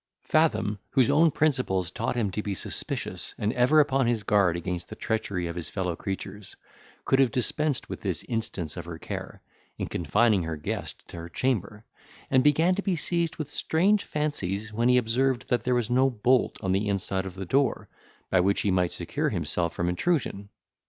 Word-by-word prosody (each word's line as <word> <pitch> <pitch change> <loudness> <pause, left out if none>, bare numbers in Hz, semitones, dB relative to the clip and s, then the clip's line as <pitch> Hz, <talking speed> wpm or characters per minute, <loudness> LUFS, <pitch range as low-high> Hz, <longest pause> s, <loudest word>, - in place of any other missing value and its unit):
Fathom, 130 -10 +2
whose 130 -4 +3
own 165 +2 +5
principles 125 - +1
taught 115 +4 -2
him 110 -5 0
to 105 - -2
be 100 -2 -3
suspicious, - - -3
and 105 +3 0
ever 125 +5 +4
upon 135 -3 +3
his 115 -3 0
guard 100 -5 +3
against 85 -1 -4
the - - -7
treachery 100 -5 -2
of 85 0 -4
his 85 -2 -4
fellow 90 -3 -2
creatures, 95 +2 -6 0.5
could 135 - +3
have 135 -2 +5
dispensed 140 +4 -1
with - - -6
this - - -2
instance 100 -9 -3
of - - -6
her 85 -1 -7
care, - - -7 0.3
in - - -2
confining 105 +3 +2
her 80 -1 -3
guest 75 - -5
to - - -9
her 85 +1 -7
chamber, 105 0 -2 0.5
and 130 -1 +5
began 160 +5 +4
to 200 - -1
be 195 -3 0
seized 170 +1 -1
with 155 - -4
strange 200 +9 +2
fancies, 115 -9 -2
when 120 +3 +2
he 125 - +5
observed 125 +2 +1
that 120 -2 +1
there 125 0 +2
was 120 -1 0
no 130 +2 +4
bolt 125 +1 +2
on 95 - 0
the 100 +2 +1
inside 95 -1 -1
of 95 - -8
the 95 0 -5
door, 135 +9 +1 0.4
by 95 - +4
which 100 +2 +2
he 100 - +1
might 90 -2 +2
secure - - -1
himself 85 -2 -1
from 85 - -1
intrusion. 100 - -1
110 Hz, 195 wpm, -27 LUFS, 95-135 Hz, 0.5 s, own